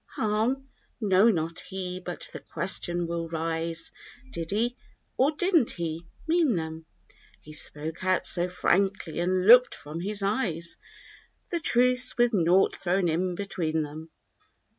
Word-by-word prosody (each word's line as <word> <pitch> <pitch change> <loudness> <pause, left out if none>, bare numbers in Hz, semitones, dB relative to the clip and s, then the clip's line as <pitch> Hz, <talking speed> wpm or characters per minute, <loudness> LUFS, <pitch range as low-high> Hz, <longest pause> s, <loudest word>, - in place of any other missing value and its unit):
Harm? 225 +6 -1 0.3
No, 205 0 +4
not 165 -4 -1
he; 185 -1 -5
but 175 -1 -5
the - - -6
question 175 -2 -1
will 170 0 -4
rise— 165 0 -3 0.4
"Did 165 -6 -5
he, 235 +5 0 0.4
or 265 +3 +3
didn't 330 - +2
he, 165 -1 -5 0.2
mean 320 - +3
them?" 160 -1 -5 0.5
He 155 - -13
spoke 155 +2 0
out 185 0 +1
so 175 0 +3
frankly 185 -1 0
and 185 +1 0
looked, 245 +3 +7
from 150 +3 -8
his 200 +3 -2
eyes. 175 -6 -1 0.7
The 340 - 0
truths, 250 -4 +3
with 240 0 +3
naught 180 0 +3
thrown 180 -1 0
in 180 +3 -1
between 165 -5 -2
them. 155 +2 -9
185 Hz, 140 wpm, -27 LUFS, 165-220 Hz, 0.7 s, looked